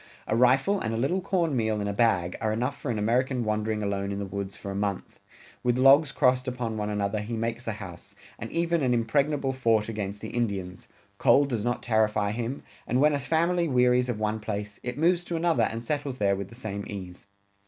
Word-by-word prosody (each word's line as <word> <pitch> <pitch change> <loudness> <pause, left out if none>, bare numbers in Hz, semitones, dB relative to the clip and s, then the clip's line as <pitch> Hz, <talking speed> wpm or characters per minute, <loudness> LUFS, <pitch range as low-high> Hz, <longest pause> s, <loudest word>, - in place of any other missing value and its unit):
A 110 - 0
rifle 135 - +4
and 110 -6 -2
a - - -2
little 145 +11 0
corn 175 -6 0
meal 110 -3 0
in 100 - -2
a 100 - -1
bag 95 -6 +2
are 110 - +1
enough 120 +5 -1
for 140 - -6
an 115 - -1
American 125 +4 +1
wandering 110 0 -1
alone 100 0 -2
in 100 - -3
the 100 - -3
woods 100 0 -5
for 100 - -7
a - - -5
month.... 100 -1 -3 0.4
With 125 0 +1
logs 135 +3 +6
crossed 125 -1 +2
upon 120 -3 -3
one 105 -1 -2
another 105 0 -1
he 115 +2 -4
makes 115 +1 -3
a 110 - -1
house, 95 -5 -10 0.2
and - - -6
even 170 -1 +1
an 125 -2 +2
impregnable 135 +4 +1
fort 115 -4 +1
against 105 -2 -4
the - - -5
Indians.... 100 -6 -3 0.3
Cold 140 0 +5
does 115 -5 -1
not 120 +1 -1
terrify 110 -2 +1
him, 120 +4 -4 0.2
and 125 - +1
when 150 +2 +4
a 145 - 0
family 170 +3 +1
wearies 125 -2 +3
of 115 -3 -2
one 110 0 -1
place, 105 -1 -5
it 125 +1 -5
moves 175 +3 +2
to 175 - -3
another 160 -10 +2
and 115 +1 -5
settles 140 0 -3
there 100 -3 +2
with 100 -1 -5
the 115 - -13
same 100 -4 -5
ease. 95 -2 -8
115 Hz, 220 wpm, -27 LUFS, 105-130 Hz, 0.4 s, logs